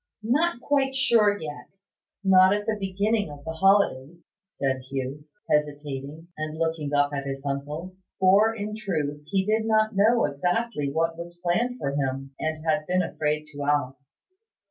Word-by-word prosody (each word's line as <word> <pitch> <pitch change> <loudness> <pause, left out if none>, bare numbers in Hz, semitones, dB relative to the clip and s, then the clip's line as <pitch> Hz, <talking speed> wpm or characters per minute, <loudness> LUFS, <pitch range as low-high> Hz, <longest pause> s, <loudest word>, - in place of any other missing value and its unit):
"Not 280 +5 +1
quite 270 -1 +1 0.2
yet; 205 -10 +2 0.5
not 190 0 +6
at 205 0 -3
the 220 -1 0
beginning 205 0 0
of 145 -1 -11
the 160 - -3
holidays," 170 -4 +2 0.3
said 135 -9 -2
Hugh, 135 +2 -4 0.2
hesitating, 145 +1 -2
and 155 0 -5
looking 160 -3 -1
up 145 0 +2
at 140 -1 -3
his 135 0 -5
uncle. 150 +6 -4 0.2
For, 195 +4 +5
in 210 0 -4
truth, 150 -9 -3
he 190 +1 0
did 220 +1 +1
not 215 -1 +2
know 225 +4 +4
exactly 165 +3 -1
what 165 +2 -1
was 175 0 -8
planned 235 +9 0
for 140 - -2
him, 135 -1 -3
and 155 0 -3
had 155 -1 +1
been 185 0 +2
afraid 150 -2 -2
to 145 - -7
ask. 140 -2 -1
165 Hz, 155 wpm, -26 LUFS, 145-205 Hz, 0.5 s, not